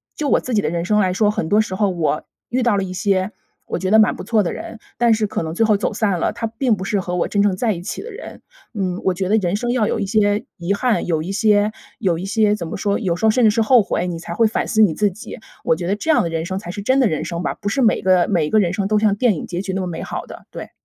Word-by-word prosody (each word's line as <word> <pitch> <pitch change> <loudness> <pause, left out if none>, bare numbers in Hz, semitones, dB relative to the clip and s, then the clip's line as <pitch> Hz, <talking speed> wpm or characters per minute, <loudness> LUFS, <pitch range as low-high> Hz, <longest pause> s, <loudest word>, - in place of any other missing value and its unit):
就 300 - -2
我 - - +4
自 255 - -5
己 205 - +3
的 - - 0
人 170 0 -2
生 210 +2 +2
来 185 -2 +2
说， 205 +2 +2
很 165 -6 -3
多 210 +1 +4
时 190 -3 -4
候 205 +1 +1
我 160 -3 -1 0.3
遇 250 +1 0
到 235 -4 +2
了 195 - 0
一 185 - -6
些， 190 +1 0 0.4
我 - - -2
觉 185 +2 -2
得 220 - +6
蛮 215 - +4
不 - - -8
错 220 +1 +2
的 175 - -2
人， 230 - -8 0.2
但 235 -1 +4
是 215 -1 0
可 190 - -3
能 160 0 -4
最 225 - +3
后 215 -1 +3
走 215 - -2
散 205 -3 0
了， - - 0
他 230 0 -3
并 230 +1 0
不 190 -1 -6
是 205 -1 0
和 180 -1 -4
我 175 - 0
真 200 - +1
正 200 -2 +2
在 225 -2 +1
一 170 - -7
起 180 - -5
的 470 - -8
人。 455 +5 -10 0.3
嗯， 185 -3 -2
我 190 - +3
觉 185 +1 -2
得 215 - +4
人 180 -4 0
生 240 +2 -2
要 240 -4 +1
有 - - -1
一 205 - -1
些 205 +2 +1
遗 175 +3 -1
憾， 220 -3 0
有 160 -3 0
一 180 - -6
些 210 +1 +2 0.3
有 180 -6 +1
一 - - -5
些 210 +1 +2
怎 175 - -5
么 - - -5
说， 200 0 0
有 185 -7 -1
时 220 - -1
候 220 - +6
甚 250 +3 +2
至 215 - +6
是 225 +1 +1
后 235 -1 +5
悔， 180 - -2
你 170 - -4
才 170 0 -7
会 225 +4 +3
反 215 - -1
思 220 - +2
你 200 -7 +5
自 205 +3 +1
己， 220 +6 -9 0.3
我 - - +3
觉 175 +1 -5
得 200 - +1
这 320 - -5
样 300 - +3
的 170 - -2
人 165 0 -3
生 190 +1 -3
才 175 -3 -7
是 200 - -6
真 260 +6 +2
的 245 - +4
人 155 - -2
生 170 0 -4
吧， - - -1
不 - - -7
是 275 - 0
每 225 -3 +3
个 185 -2 +3
每 170 -6 +2
一 - - -4
个 215 - +4
人 175 -4 +1
生 195 -1 -1
都 215 0 +2
像 215 -2 +3
电 225 -4 +3
影 - - -5
结 175 0 -4
局 190 -1 -4
那 190 - -1
么 185 - -3
美 170 - -5
好 - - -5
的， - - -12
对。 - - -8
205 Hz, 350 characters per minute, -20 LUFS, 180-220 Hz, 0.4 s, 得